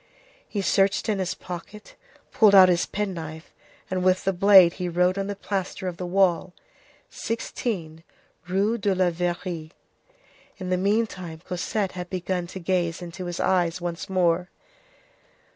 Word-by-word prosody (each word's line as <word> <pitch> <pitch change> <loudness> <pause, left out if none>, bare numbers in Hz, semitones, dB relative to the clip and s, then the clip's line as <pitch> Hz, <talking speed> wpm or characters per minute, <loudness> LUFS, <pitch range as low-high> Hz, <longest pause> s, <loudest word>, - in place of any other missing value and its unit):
He 200 -2 -2
searched 195 +3 +2
in 205 -2 0
his 185 0 -2
pocket, 185 +4 -9 0.4
pulled 210 -3 +5
out 185 -1 +9
his 175 -1 +2
penknife, 165 -6 -5 0.3
and 185 -1 -2
with 185 0 +3
the 195 - +1
blade 185 -2 +7
he 180 - -1
wrote 180 +2 +2
on 195 0 -2
the 205 - -3
plaster 195 -1 -4
of 175 -2 -4
the 180 - -4
wall:— 180 -1 +1 0.6
"16 180 -8 -4 0.4
Rue 200 +5 +1
de 200 -1 +1
la 185 -1 +2
Verrerie." 175 -1 -3 0.8
In 185 -2 -5
the - - +3
meantime, 190 -5 -1
Cosette 190 +2 -2
had 180 -1 -7
begun 180 -1 -2
to 185 - -8
gaze 175 -1 -1
into 175 +2 -7
his 175 -1 -5
eyes 175 -2 +1
once 175 0 -5
more. 180 -1 +1
185 Hz, 150 wpm, -25 LUFS, 175-195 Hz, 0.8 s, out